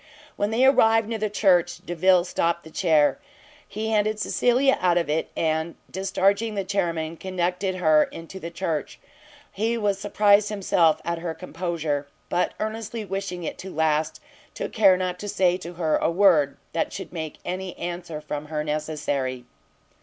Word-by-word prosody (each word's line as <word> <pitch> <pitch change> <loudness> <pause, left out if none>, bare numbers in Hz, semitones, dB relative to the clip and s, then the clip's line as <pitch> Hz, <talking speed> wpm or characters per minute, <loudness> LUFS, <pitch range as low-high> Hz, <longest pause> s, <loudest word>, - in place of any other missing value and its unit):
When 205 - 0
they 235 +4 +3
arrived 225 -4 +5
near 225 -1 -3
the 215 0 -1
church, 180 -4 +2
Delvile 175 +1 +3
stopt 170 -1 -1
the 160 - -13
chair. 155 - +3 0.5
He 220 +2 -4
handed 215 0 +1
Cecilia 255 +5 +3
out 175 -1 +3
of 170 -4 0
it, 160 +2 -1
and 160 +1 0 0.2
discharging 195 +3 +1
the 200 - -1
chairmen, 170 -4 -2
conducted 185 +1 -2
her 155 -4 +4
into 165 +3 -10
the 170 - -6
church. 165 -4 -3 0.5
He 225 +3 -1
was 205 -3 0
surprised 205 0 +3
himself 180 -6 +2
at 170 0 -2
her 165 -1 -4
composure, 160 -4 -3 0.2
but 180 - 0
earnestly 220 0 -4
wishing 195 -2 -4
it - - -5
to 190 - -7
last, 155 -1 0 0.4
took - - -5
care 195 -4 +5
not 180 -1 -3
to 205 - -5
say 185 -3 +2
to 175 -1 -8
her 160 -3 +1
a - - +1
word 170 -6 +4 0.2
that 165 - -1
should 195 - -7
make 160 -3 -5
any 185 0 -4
answer 175 -2 -5
from 150 0 -5
her 150 0 -2
necessary. 150 -4 -2
180 Hz, 165 wpm, -24 LUFS, 160-200 Hz, 0.5 s, arrived